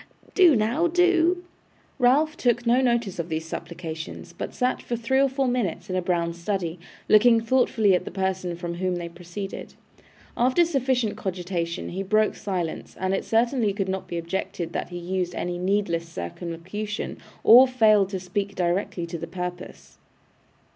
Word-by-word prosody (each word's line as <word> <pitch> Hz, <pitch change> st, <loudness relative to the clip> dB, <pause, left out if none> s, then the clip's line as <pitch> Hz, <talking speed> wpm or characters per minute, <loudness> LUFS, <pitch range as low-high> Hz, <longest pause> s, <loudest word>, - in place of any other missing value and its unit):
Do 355 Hz, -6 st, +6 dB
now, 235 Hz, +10 st, +2 dB
do.' 355 Hz, 0 st, +3 dB, 0.6 s
Ralph 290 Hz, +5 st, +3 dB
took 240 Hz, -6 st, +1 dB
no 240 Hz, +2 st, +4 dB
notice 235 Hz, -7 st, 0 dB
of 170 Hz, +1 st, -3 dB
these 160 Hz, 0 st, -2 dB
supplications, 160 Hz, -1 st, -7 dB
but -, -, -5 dB
sat 250 Hz, 0 st, -1 dB
for 240 Hz, -, -3 dB
three 235 Hz, +3 st, +1 dB
or 275 Hz, -, +3 dB
four 265 Hz, 0 st, 0 dB
minutes 210 Hz, -6 st, -2 dB
in -, -, -1 dB
a 185 Hz, -, +1 dB
brown 170 Hz, -1 st, 0 dB
study, 170 Hz, -1 st, -3 dB, 0.3 s
looking 230 Hz, +2 st, +6 dB
thoughtfully 225 Hz, -3 st, +2 dB
at 180 Hz, -, +2 dB
the -, -, -6 dB
person 190 Hz, -2 st, -2 dB
from 170 Hz, 0 st, -5 dB
whom 180 Hz, +1 st, -1 dB
they 175 Hz, -1 st, -4 dB
proceeded. 175 Hz, +3 st, -7 dB, 0.6 s
After 255 Hz, +8 st, +3 dB
sufficient 260 Hz, -8 st, 0 dB
cogitation 175 Hz, -2 st, -3 dB
he 185 Hz, +2 st, -4 dB
broke 215 Hz, +2 st, +2 dB
silence, 180 Hz, -5 st, -4 dB
and 190 Hz, 0 st, 0 dB
it 195 Hz, -, 0 dB
certainly 230 Hz, -2 st, +1 dB
could 195 Hz, -1 st, -2 dB
not 190 Hz, 0 st, -3 dB
be 170 Hz, -, -4 dB
objected 170 Hz, 0 st, -4 dB
that -, -, -3 dB
he 175 Hz, -, -6 dB
used 180 Hz, 0 st, -2 dB
any 175 Hz, 0 st, -3 dB
needless 180 Hz, -3 st, 0 dB
circumlocution, 170 Hz, -, -5 dB, 0.2 s
or 250 Hz, +3 st, +9 dB
failed 215 Hz, -6 st, +4 dB
to 190 Hz, -2 st, -3 dB
speak 195 Hz, +2 st, -3 dB
directly 175 Hz, 0 st, -1 dB
to 170 Hz, 0 st, -6 dB
the 165 Hz, -, -5 dB
purpose. 180 Hz, 0 st, -7 dB
195 Hz, 165 wpm, -25 LUFS, 175-240 Hz, 0.6 s, or